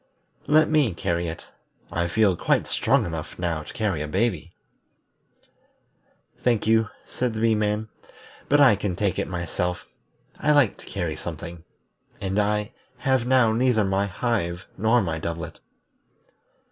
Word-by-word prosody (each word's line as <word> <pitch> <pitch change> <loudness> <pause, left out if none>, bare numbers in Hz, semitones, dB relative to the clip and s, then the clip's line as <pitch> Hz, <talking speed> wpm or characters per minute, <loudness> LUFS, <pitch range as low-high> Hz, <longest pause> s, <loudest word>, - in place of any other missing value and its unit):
"Let 155 +1 +5
me 145 - +2
carry 85 0 -1
it. 80 +1 -6 0.5
I 85 0 0
feel 100 +1 +3
quite - - +1
strong - - +2
enough 80 -2 -6
now 85 -3 -1
to - - -10
carry 100 -8 -1
a 75 - -3
baby." 90 -1 -1 1.9
"Thank 120 -3 +2
you," 110 0 +3 0.2
said 125 -3 -2
the - - -3
Bee 115 0 +3
man, 105 0 0 0.6
"but 145 - +5
I 135 -7 +7
can 100 -2 -2
take 95 -1 0
it - - -1
myself. 90 0 -3 0.5
I 150 - +3
like 145 -8 +4
to - - -15
carry 85 -5 -3
something, 85 0 -7 0.5
and 95 +1 -1
I 105 +1 0 0.3
have 130 -1 +1
now 125 -4 +4
neither 120 -2 +3
my 95 +1 +1
hive 95 -5 -2
nor 110 +3 +3
my 80 -3 -2
doublet." 85 +1 -5
100 Hz, 145 wpm, -25 LUFS, 85-115 Hz, 1.9 s, I